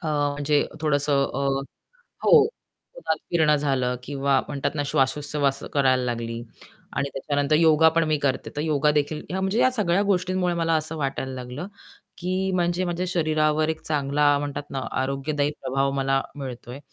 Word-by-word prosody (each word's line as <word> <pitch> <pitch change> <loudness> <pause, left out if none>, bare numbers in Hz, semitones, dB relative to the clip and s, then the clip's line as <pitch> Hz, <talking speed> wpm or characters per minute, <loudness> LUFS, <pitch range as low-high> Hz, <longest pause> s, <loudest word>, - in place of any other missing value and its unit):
अ, - - -4 0.3
म्हणजे 145 0 +2
थोडंसं 145 -2 +2
अ, 140 +1 -1 0.8
हो, 475 - +8 0.6
उन्हात - - -1
फिरणं 155 -3 +4
झालं 130 -3 0
किंवा 140 0 +1
म्हणतात 140 +2 -2
ना, 145 - -1
श्वाशोश्वास 140 +1 0
करायला 130 -3 +3
लागली. 115 -1 -3 0.5
आणि 140 - 0
त्याच्यानंतर 145 +2 0
योगापण 160 +1 +5
मी 155 -1 +1
करते, 140 -2 -1
तर - - -1
योगादेखील 150 0 +1
या 190 +1 -2
म्हणजे 190 +7 +3
सगळ्या 195 -2 +2
गोष्टींमुळे 185 -1 +1
मला 165 -1 +1
असं 155 +1 -3
वाटायला 135 -2 -3
लागलं 125 +6 -6 0.5
की, 185 +2 -1
म्हणजे 175 0 +1
माझ्या 175 0 -2
शरीरावर 155 -2 +1
एक 160 0 -2
चांगला 145 -1 +1
म्हणतात 145 0 -4
ना, 135 - -3 0.2
आरोग्यदायी 140 +2 -1
प्रभाव 135 +1 0
मला 135 0 +1 0.2
मिळतोय 130 -2 -7
150 Hz, 145 wpm, -24 LUFS, 135-160 Hz, 0.8 s, हो